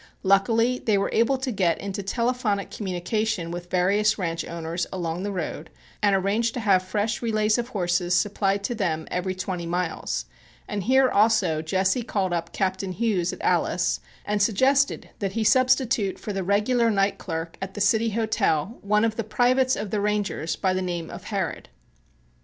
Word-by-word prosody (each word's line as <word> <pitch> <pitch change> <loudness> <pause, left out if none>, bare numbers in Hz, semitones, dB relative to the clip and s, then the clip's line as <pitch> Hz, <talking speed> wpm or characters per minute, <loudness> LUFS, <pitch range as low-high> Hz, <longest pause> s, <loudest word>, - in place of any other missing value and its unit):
Luckily 225 +5 +3
they 215 -3 +1
were 195 - 0
able 235 +4 +3
to 260 0 -3
get 185 -6 +1
into 200 0 -4
telephonic 230 -1 -1
communication 190 -1 -2
with 175 0 -6
various 200 +4 +2
ranch 165 -4 -2
owners 170 +1 -4
along 175 -2 -3
the 205 +1 -3
road 160 -3 -4 0.3
and 205 -2 +4
arrange 210 +5 +1
to - - -3
have 200 -5 +3
fresh 205 +4 -2
relays 215 -1 +1
of 240 - -2
horses 180 -5 0
supplied 200 +1 +1
to 240 - -1
them 170 -8 -2
every 185 +1 -2
twenty 185 -2 -4
miles, 175 -1 -2 0.4
and 205 -2 -3
here 265 +2 +5
also 205 -8 +3
Jesse 190 +8 +1
called 195 -5 -1
up 170 0 -2
Captain 190 -1 -2
Hughes 190 -4 0
at - - -9
Alice, - - +1 0.3
and 205 0 0
suggested 265 +7 +2
that 195 -2 -2
he 225 - 0
substitute 245 -3 +3
for 210 - -5
the 195 -1 -2
regular 215 +5 +2
night 200 -2 +1
clerk 165 -1 -5
at 195 0 -5
the - - -5
City 220 +3 +3
Hotel 215 -4 0
one 210 +2 +2
of 220 -1 -1
the 230 - -1
privates 255 +4 +2
of 205 -1 -5
the 210 - 0
Rangers 205 -6 -1
by 190 -2 0
the 185 - -1
name 175 -3 -4
of 180 +2 -9
Harrod. 195 -6 -3
200 Hz, 175 wpm, -25 LUFS, 180-220 Hz, 0.4 s, here